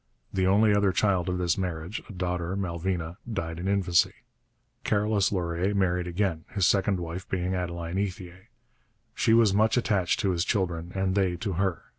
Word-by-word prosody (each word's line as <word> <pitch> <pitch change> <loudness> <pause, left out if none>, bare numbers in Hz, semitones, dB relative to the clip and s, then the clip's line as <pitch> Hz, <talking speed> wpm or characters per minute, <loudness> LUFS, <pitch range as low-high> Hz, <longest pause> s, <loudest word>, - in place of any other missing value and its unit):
The 95 -1 +1
only 105 +2 +4
other 100 -1 +3
child 95 -3 +1
of 90 - -1
this 90 0 0
marriage, 90 +1 -4
a - - -7
daughter, 90 0 -2
Malvina, 90 -2 -3
died 85 -5 -3
in 90 - -3
infancy. 95 -4 +2 0.7
Carolus 105 -1 +1
Laurier 90 +1 -1
married 90 -2 +1
again, 90 -2 -1
his 100 -3 +1
second 95 -1 +2
wife 85 +2 -6
being 90 0 -1
Adeline 85 -1 -3
Ethier. 95 0 -5 0.7
She 115 -1 +3
was 115 -4 +5
much 110 +4 +3
attached 100 -7 +1
to 100 -3 +1
his 85 -1 0
children 90 -5 -1
and 95 -1 0
they 95 -3 +1
to 100 +2 -3
her. 95 0 -1
95 Hz, 170 wpm, -27 LUFS, 85-100 Hz, 0.7 s, was